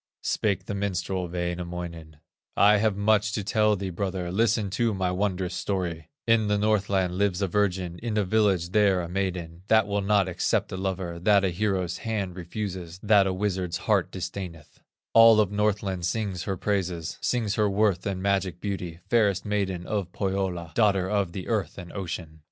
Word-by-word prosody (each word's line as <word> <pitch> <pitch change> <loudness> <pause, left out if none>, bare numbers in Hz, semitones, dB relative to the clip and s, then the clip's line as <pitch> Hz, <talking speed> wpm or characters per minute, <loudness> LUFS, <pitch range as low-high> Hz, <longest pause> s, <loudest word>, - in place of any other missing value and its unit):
Spake 100 -3 0
the 100 - -4
minstrel, 95 -2 -2
Wainamoinen: 85 -2 -5 0.4
"I 105 +1 +6
have 105 -1 +1
much 105 +1 +2
to 105 - -2
tell 105 +1 +2
thee, 95 -1 -4
brother, 90 -1 -3
Listen 110 0 +1
to 115 +1 +1
my 95 -1 0
wondrous 95 -1 -1
story: 90 -3 -3 0.2
In 115 -2 +3
the 105 0 +2
Northland 100 -3 +1
lives 100 -3 +1
a - - +2
virgin, 95 -3 -1
In 115 -2 -3
a 105 - +3
village 95 -4 +2
there, 100 -2 +3
a 85 - -4
maiden, 90 -2 -3
That 110 -1 +5
will 100 0 -1
not 100 -1 +2
accept 90 - 0
a - - -3
lover, 95 -2 -3
That 100 +2 +4
a - - +2
hero's 90 -1 -1
hand 100 -5 -3
refuses, 90 -1 -5
That 105 -2 +5
a - - +1
wizard's 95 -3 -1
heart - - +1
disdaineth; 90 -4 -7 0.3
All 115 -1 +8
of 105 -3 +2
Northland 100 -3 0
sings 100 -2 -2
her 95 -2 -2
praises, 90 -5 -2
Sings 115 -5 0
her 105 -1 +2
worth 100 -2 +2
and 95 -1 -3
magic 95 -3 0
beauty, 90 -4 -4
Fairest 100 -5 +2
maiden 95 -4 -1
of 100 -3 -2
Pohyola, 95 -4 -2
Daughter 100 -5 +3
of 100 -4 +1
the 90 +1 -6
earth 110 -4 -1
and 90 -3 -9
ocean. 85 -5 -6
95 Hz, 175 wpm, -26 LUFS, 90-105 Hz, 0.4 s, All